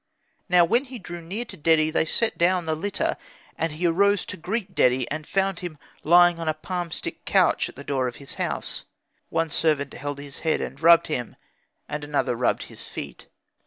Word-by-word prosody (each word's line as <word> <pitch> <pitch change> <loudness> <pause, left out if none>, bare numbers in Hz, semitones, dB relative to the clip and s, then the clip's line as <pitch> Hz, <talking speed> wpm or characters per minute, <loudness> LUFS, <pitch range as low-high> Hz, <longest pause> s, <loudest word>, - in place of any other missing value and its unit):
Now 175 -1 +6
when 240 +10 +2
he 255 -1 -8
drew 175 -4 -8
near 195 +9 -4
to 205 - -10
Dedi, 160 -1 +3
they 160 - +2
set 225 +7 +1
down 180 0 +2
the 160 - 0
litter. 195 +6 -1 0.4
And 165 -1 -2
he 165 +4 -2
arose 200 +4 +3
to - - -6
greet 190 +3 -4
Dedi, 125 -5 +3
and 155 0 -4
found 195 -2 0
him 175 -4 -6 0.3
lying 175 +1 +6
on 165 -1 -1
a 155 - 0
palmstick 175 +1 -4
couch - - +3
at - - -14
the 140 - -9
door 135 -3 0
of 120 - -5
his 140 - -5
house; - - -2 0.4
one 165 -1 0
servant 145 -4 +1
held 145 0 -5
his 140 -1 -7
head 160 -1 +1
and 135 +2 -6
rubbed 170 0 +7
him, 125 -6 -3 0.5
and 150 0 -4
another 145 -4 0
rubbed 120 +1 +1
his - - -8
feet. - - -7
165 Hz, 200 wpm, -25 LUFS, 150-180 Hz, 0.5 s, rubbed